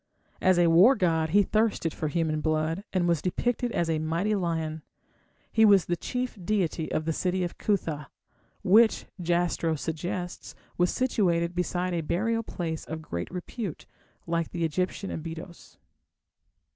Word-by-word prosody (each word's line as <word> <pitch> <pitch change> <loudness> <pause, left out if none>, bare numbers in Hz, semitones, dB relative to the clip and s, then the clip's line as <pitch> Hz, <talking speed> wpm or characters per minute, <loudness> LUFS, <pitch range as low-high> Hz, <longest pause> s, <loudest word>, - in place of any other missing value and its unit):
As 185 -1 +4
a 175 - +5
war 180 +11 +7
god 165 -6 +1
he 205 +5 +5
thirsted 215 -6 +1
for 155 - -3
human 155 -1 0
blood, 155 +4 0
and 180 -2 +1
was 170 -3 +2
depicted 240 +6 -1
as 170 - 0
a 160 -1 0
mighty 165 +7 0
lion. 160 -5 -1 0.7
He 220 - +4
was 200 -4 +6
the 175 - 0
chief 250 +4 -4
deity 175 -5 -1
of 155 - -1
the 160 - 0
city 185 +2 0
of 175 - -5
Cuthah, 160 -8 -1 0.6
which, 220 +4 +5 0.2
Jastrow 170 -1 +1
suggests, 175 +4 -4 0.2
was 175 0 +2
situated 175 -9 +1
beside 180 +1 -1
a 170 - 0
burial 220 +9 0
place 165 -7 -4
of 160 0 -6
great 85 - -4
repute, 180 0 -6 0.4
like 170 -1 -1
the 170 -2 -1
Egyptian 180 +5 -2
Abydos. 165 +2 -8
175 Hz, 150 wpm, -27 LUFS, 160-190 Hz, 0.7 s, war